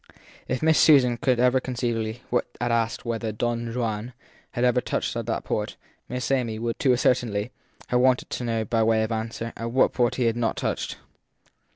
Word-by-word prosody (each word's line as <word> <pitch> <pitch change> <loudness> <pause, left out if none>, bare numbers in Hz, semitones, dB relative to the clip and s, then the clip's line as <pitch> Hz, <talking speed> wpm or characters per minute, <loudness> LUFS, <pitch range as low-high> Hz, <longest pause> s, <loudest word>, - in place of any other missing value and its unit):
If 130 +4 -2
Miss 160 0 +4
Susan 125 -6 +6
could 130 0 +1 0.3
conceivably 120 -2 -2 0.4
have 120 0 0
asked 115 0 0
whether 115 -1 -2
Don 115 +2 -2
Juan 115 0 -3 0.4
had 120 - -1
ever 125 0 +3
touched - - -2
at - - -3
that - - -1
port, - - -2 0.3
Miss 125 0 -3
Amy 120 -5 0
would, 115 +1 -3
to 135 -6 +4
a - - +2
certainty, 120 -3 +1 0.4
have 125 - +3
wanted 130 0 +2
to - - -3
know 115 -2 -1
by 115 +2 +1
way 110 0 +3
of 110 - -3
answer 115 +1 -3
at 115 +1 -4
what 130 +2 +3
port 120 -2 +1
he 130 - 0
had 115 -1 +2
not 120 -1 -1
touched. - - -2
120 Hz, 190 wpm, -25 LUFS, 115-125 Hz, 0.4 s, Susan